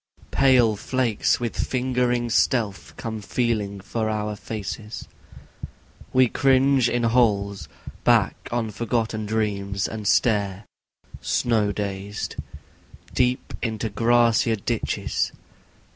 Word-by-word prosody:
II - - -29
Pale 125 -5 +4
flakes 120 -1 0
with 120 -2 -3
lingering 125 -2 0
stealth 110 -3 0
come 110 -2 -5
feeling 105 -3 -1
for 110 +3 -2
our 105 -1 -2
faces 105 +1 -6 1.0
We 130 0 +5
cringe 135 0 +3
in 120 0 0
holes, 100 - +2 0.4
back - - +2
on 115 -2 -1
forgotten 110 -1 -2
dreams, 100 -3 -1
and 110 -2 -5
stare, 100 -3 +2 0.6
snow 110 -4 +1
dazed, 100 0 -4 0.8
Deep 125 0 0
into 110 -2 -2
grassier 115 +1 +3
ditches. 100 - -2
110 Hz, 100 wpm, -24 LUFS, 105-120 Hz, 1.0 s, We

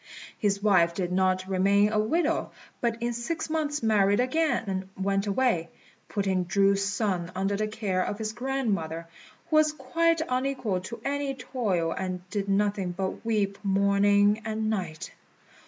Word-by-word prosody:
His 200 -2 0
wife 175 -5 +4
did 180 -1 -2
not 185 0 +1
remain 200 +2 +3
a 215 - +1
widow, 320 +9 +1 0.3
but 235 -1 -1
in 240 0 0
six 310 +7 -3
months 300 -4 -1
married 205 -1 +3
again 310 +5 +1
and 190 -1 -3
went 195 +1 0
away, 200 -6 +1 0.4
putting 190 -3 0
Chu's 195 +2 +3
son 195 -4 -1
under 195 +2 0
the 215 +1 -1
care 205 -4 -1
of 205 - -3
his 215 0 -3
grandmother, 215 -11 -2 0.5
who 310 - +5
was 310 0 +5
quite 325 +4 +1
unequal 255 -7 -1
to 230 +5 -7
any 280 0 -1
toil, 205 -10 -1
and 185 0 -4
did 200 -1 -2
nothing 195 -2 +1
but 190 +3 -4
weep 210 -3 -1
morning 200 +1 +3
and 220 0 -1
night. 175 -7 -4
205 Hz, 155 wpm, -27 LUFS, 190-240 Hz, 0.5 s, who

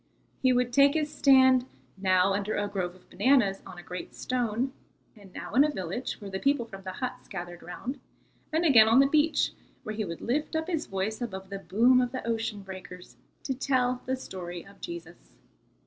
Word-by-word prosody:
He 260 - +4
would 245 -1 +1
take 280 +3 +5
his 305 -1 -1
stand, 260 -2 +5 0.3
now 190 0 +3
under 200 +2 -1
a 205 0 0
grove 185 -3 -3
of 185 - -21
bananas 205 -2 +2
on 185 -2 -10
a 175 - -9
great 180 0 -7
stone, 250 +1 -1 0.4
and 200 -3 -15
now - - -8
in 275 - +6
a 300 - +2
village, 195 - -3
where 200 -2 -8
the 190 - -3
people 275 -1 +1
from 195 -3 -10
the 185 -1 -6
huts 250 +6 -5
gathered 175 -3 -7
round, 240 +10 -6 0.5
and 320 +2 +1
again 230 -8 +7
on 225 +2 +5
the 275 - +7
beach, 305 +3 +2 0.3
where 215 - -4
he 215 0 -2
would 170 -4 -6
lift 295 +7 -1
up 320 0 0
his 335 -3 -2
voice 195 +4 -3
above 190 -5 -5
the 195 - -4
boom 240 +6 +4
of 245 0 -2
the 255 - -4
ocean 225 -3 -2
breakers 185 -1 -10 0.3
to 270 - -1
tell 255 -1 0
the 260 - +1
story 180 -8 -7
of 200 0 -17
Jesus. 170 0 -9
220 Hz, 200 wpm, -28 LUFS, 190-260 Hz, 0.5 s, again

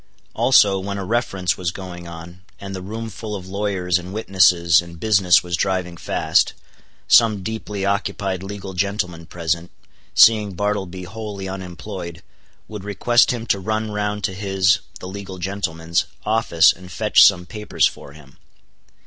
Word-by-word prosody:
Also, 100 -7 +4
when 100 +1 -4
a 100 - -4
Reference 100 -4 -1
was 90 -2 -1
going 90 -1 -8
on, 85 +2 -10 0.2
and 100 -1 -7
the 95 - -5
room 110 +4 -6
full 105 0 -6
of 95 -2 -8
lawyers 95 -3 -1
and 90 +1 -9
witnesses 90 -5 +4
and 85 -1 -12
business 95 -4 +4
was 90 -1 -2
driving 90 0 -1
fast; - - +1 0.5
some 110 -5 +5
deeply 105 -2 -4
occupied 100 -2 -1
legal 95 0 -7
gentleman 90 -3 -2
present, 85 0 -2 0.5
seeing 105 -3 +6
Bartleby 95 -2 -2
wholly 100 0 -6
unemployed, 90 -1 -7 0.4
would 105 -2 -8
request 105 +4 +3
him 120 -2 -2
to 100 -3 +1
run 110 +2 -2
round 105 0 -2
to 95 - -1
his 95 +2 +2 0.2
(the - - -8
legal 95 0 -8
gentleman's) 85 -3 -2 0.2
office 105 -7 +4
and 90 0 -13
fetch - - +5
some 90 -3 +5
papers 105 +2 0
for 70 - -4
him. 70 -3 -17
95 Hz, 150 wpm, -21 LUFS, 90-105 Hz, 0.5 s, seeing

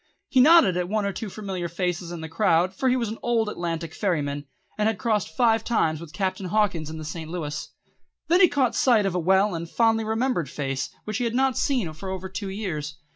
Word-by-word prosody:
He 260 - +5
nodded 310 - +7
to 180 +1 0
one 210 +2 -1
or 200 - -1
two 220 - -5
familiar 190 -4 -4
faces 175 0 -2
in 170 -2 -6
the 160 - -5
crowd, 165 +3 +2
for 260 +7 0
he 250 - +3
was 235 -4 -1
an 220 - -6
old 230 -2 +1
Atlantic 165 -4 -4
ferryman, 145 -7 -2 0.3
and 210 0 +1
had 220 -2 0
crossed 215 -3 0
five 225 -3 +3
times 160 -10 0
with 170 -3 -10
Captain 190 +1 -2
Hawkins 185 -6 0
in 160 - -6
the 155 - -7
St. 160 0 -6
Louis. 150 -4 -4 0.6
Then 350 +3 +4
he 365 - +8
caught 260 -6 +1
sight 230 -6 +3
of 195 - 0
a 180 - 0
well 190 +4 +3
and 165 0 -5
fondly 225 +1 +2
remembered 220 - 0
face 135 -2 -3
which 215 -1 -3
he - - 0
had 230 0 -2
not 265 -1 +2
seen 230 - 0
for 175 +5 -7
over 190 0 -5
two 190 +1 -5
years. 155 -7 -4
190 Hz, 230 wpm, -25 LUFS, 165-225 Hz, 0.6 s, he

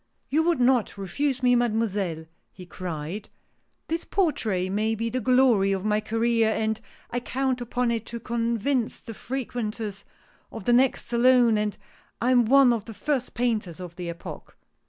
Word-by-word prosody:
" - - -47
You 305 +3 +3
would 335 -3 +1
not 245 -4 +2
refuse 260 +8 -2
me. 245 0 +5
Mademoiselle! 210 -8 0
" - - -47
he 185 - -12
cried. 175 +2 -6 0.6
This 330 +1 -2
portrait 215 - 0
may 215 +3 0
be 230 +1 -2
the 255 - -1
glory 250 -6 +4
of 190 +1 -3
my 210 0 +2
career, 225 +1 +1
and 220 0 -1 0.3
I 245 - -1
count 260 0 -1
upon 245 0 0
it 230 -1 -3
to 235 - -6
convince 235 +2 -1
the 225 - -9
frequenters 220 -5 -4 0.5
of 220 -4 -8
the 240 - +3
next 255 +2 +3
Salon 245 -1 +5
that 210 -1 -1 0.4
I 245 +2 +2
am 245 -2 +5
one 265 +1 +6
of 220 -3 -3
the 225 - -9
first 270 -1 -2
painters 215 -8 -1
of 175 -2 -8
the 175 -1 -5
epoch." 170 0 -9
230 Hz, 175 wpm, -26 LUFS, 210-250 Hz, 0.6 s, one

